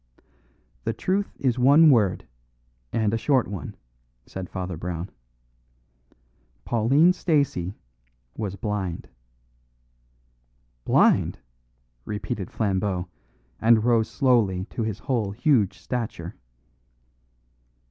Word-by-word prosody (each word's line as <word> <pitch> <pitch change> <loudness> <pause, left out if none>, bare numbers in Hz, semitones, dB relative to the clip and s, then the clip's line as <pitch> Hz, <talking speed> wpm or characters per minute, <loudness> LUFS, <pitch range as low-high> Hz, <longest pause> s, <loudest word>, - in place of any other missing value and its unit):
"The - - -1
truth 195 +2 -2
is 125 -2 0
one 145 +5 +7
word, 105 -8 +2 0.6
and 110 -2 0
a 115 - 0
short 130 0 +2
one," 95 -7 -6 0.5
said 95 -2 -7
Father 90 -2 -4
Brown. 85 +2 -5 1.5
"Pauline 135 +10 +4
Stacey 140 - 0 0.6
was 100 -3 -4
blind." 95 -3 -4 1.8
"Blind!" - - +3 0.7
repeated 105 - -4
Flambeau, 95 -3 -1 0.5
and 115 -1 +4
rose 115 -2 +2
slowly 110 -8 +2
to - - -4
his 110 -3 -2
whole 115 -5 -1
huge 110 - +2
stature. 120 +4 -5
110 Hz, 90 wpm, -25 LUFS, 95-125 Hz, 1.8 s, one